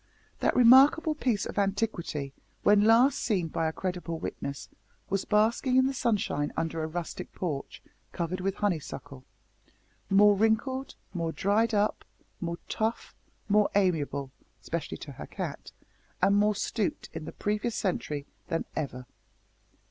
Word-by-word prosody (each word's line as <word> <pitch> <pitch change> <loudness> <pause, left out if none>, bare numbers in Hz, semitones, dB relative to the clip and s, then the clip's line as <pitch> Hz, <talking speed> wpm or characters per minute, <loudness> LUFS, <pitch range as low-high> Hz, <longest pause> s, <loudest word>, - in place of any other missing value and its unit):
That - - +1
remarkable 270 +6 +7
piece 245 -9 0
of - - -3
antiquity, 195 -8 -1 0.3
when 205 0 +6
last 235 +5 +5
seen 185 -7 0
by 165 0 -1
a - - 0
credible 175 -1 -4
witness, 140 -3 -5 0.4
was 195 0 0
basking 225 +5 +2
in 260 - +5
the 270 - 0
sunshine 205 - 0
under 165 0 -1
a 155 - -2
rustic 170 +1 -5
porch 150 -7 -4 0.3
covered 180 +2 -3
with 195 +1 -1
honeysuckle, 155 -9 -3 0.9
more 205 +1 +6
wrinkled, 235 +6 0 0.2
more 165 -3 -2
dried 215 +6 +1
up, 205 +1 +1 0.4
more 170 -1 -3
tough, 220 +1 -2 0.3
more 210 0 +4
amiable 150 -8 +1 0.3
especially 170 -2 -4
to 145 - -9
her 130 - -9
cat - - -6 0.5
and 200 - +4
more 210 +1 +3
stooped 205 +1 -2
in 155 - -6
the - - -6
previous 210 +2 -2
century 150 -6 -2 0.2
than 165 -2 -1
ever. 130 -4 -4
195 Hz, 140 wpm, -29 LUFS, 165-220 Hz, 0.9 s, remarkable